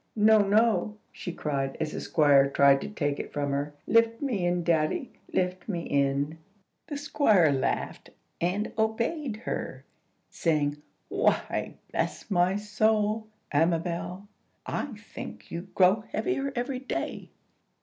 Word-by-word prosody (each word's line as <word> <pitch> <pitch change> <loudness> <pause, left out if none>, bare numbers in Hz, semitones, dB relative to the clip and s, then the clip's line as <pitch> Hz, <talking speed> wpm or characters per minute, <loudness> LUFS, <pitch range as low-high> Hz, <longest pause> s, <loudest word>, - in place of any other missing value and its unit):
"No, 215 0 +6
no!" 215 +1 +2
she 180 - -6
cried, 135 -4 -2
as 155 -1 -1
the - - -5
Squire 140 -3 +4
tried 140 0 +5
to - - -5
take 145 -8 -2
it - - -6
from 145 -1 -1
her. 145 +1 -2
"Lift 230 0 +3
me 220 -11 0
in, 175 0 0
daddy, 165 - +1 0.2
lift 180 +2 -1
me 175 -4 -1
in!" 140 +2 0 0.5
The 295 -3 -4
Squire 220 - +3
laughed, 135 -2 -2 0.3
and 185 +5 0
obeyed 230 +2 -1
her, - - -4 0.4
saying, 150 -3 0 0.3
"Why, - - 0 0.2
bless - - -2
my 180 +1 +3
soul, 215 +1 +1 0.2
Amabel, 170 +4 0 0.4
I - - -2
think 220 - -10
you 175 +3 -5
grow 190 +3 +5
heavier 275 -7 -1
every 250 +2 -2
day." 265 - -4
180 Hz, 130 wpm, -28 LUFS, 150-220 Hz, 0.5 s, No